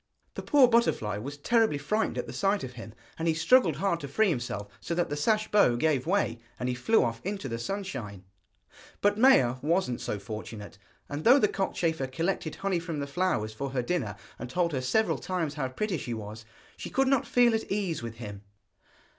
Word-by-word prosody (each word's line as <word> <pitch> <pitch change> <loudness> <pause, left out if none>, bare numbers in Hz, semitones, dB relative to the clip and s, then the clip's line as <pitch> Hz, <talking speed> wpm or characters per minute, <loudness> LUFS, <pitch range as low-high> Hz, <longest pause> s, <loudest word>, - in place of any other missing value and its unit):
The - - -5
poor 280 -3 +5
butterfly 230 - +1
was 140 +6 -6
terribly 220 +1 +2
frightened 210 +10 -1
at - - -2
the - - -8
sight 200 0 +1
of 130 - -5
him, 115 -2 -10 0.2
and 165 - -1
he 160 - +2
struggled 165 - +4
hard 170 +1 0
to 140 - -6
free 210 +9 +2
himself, 120 - -3
so 170 - -3
that 175 0 0
the - - 0
sash 215 +8 +1
bow 200 -13 +5
gave 140 +1 +1
way, 195 -9 +1 0.2
and 125 - -2
he 125 - 0
flew 175 - +3
off 115 -1 -2
into 195 -6 -4
the 115 -2 -4
sunshine. 120 - -5 0.8
But 205 +1 +2
Maia 130 - +5
wasn't 165 -5 0
so 105 - -3
fortunate, 105 0 -8 0.3
and 145 +2 -5
though 255 +4 +7
the 210 - +4
cockchafer 165 -7 -1
collected 165 +3 -2
honey 195 -3 -1
from 165 -2 -5
the 140 - -2
flowers 140 -8 -1
for 135 +5 -4
her 125 -2 0
dinner, 120 - -2 0.2
and 125 - -6
told 170 +5 0
her 135 -3 -2
several 220 +13 +1
times 170 -5 -2
how 145 -3 -2
pretty 175 +6 -2
she 120 -2 -4
was, 110 +1 -8 0.3
she - - -6
could 270 0 +1
not 270 -2 +2
feel 245 -1 +4
at 220 - -2
ease 195 -8 -1
with 115 -1 -6
him. 105 -4 -8
155 Hz, 205 wpm, -28 LUFS, 120-200 Hz, 0.8 s, though